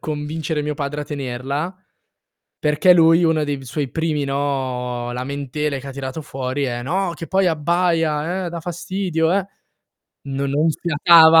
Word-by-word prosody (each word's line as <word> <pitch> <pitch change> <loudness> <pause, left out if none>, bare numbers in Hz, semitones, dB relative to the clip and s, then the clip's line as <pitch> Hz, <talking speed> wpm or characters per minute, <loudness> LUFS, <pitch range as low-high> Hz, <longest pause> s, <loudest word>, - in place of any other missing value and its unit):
convincere 155 +1 -3
mio 150 - -2
padre 145 0 -3
a - - -7
tenerla, 140 +5 -4 0.8
perché 155 +4 +4
lui 165 0 +5
uno 160 -2 +2
dei 140 -2 -3
suoi 140 +2 -2
primi, 160 -3 -1
no, 130 -3 -2
lamentele 140 +2 -3
che 140 - -11
ha 135 - -5
tirato 135 +3 -5
fuori 135 0 -3
è: 120 -2 -2
"No, 180 +5 -1
che 165 - -7
poi 190 0 +2
abbaia, 165 +1 +1
eh, - - -2
dà 170 -1 -5
fastidio 175 -1 -1
eh". 195 -1 +2 0.8
No 135 +1 -1
non 150 +4 +2
fiatava. 160 +1 +6
150 Hz, 155 wpm, -21 LUFS, 140-165 Hz, 0.8 s, fiatava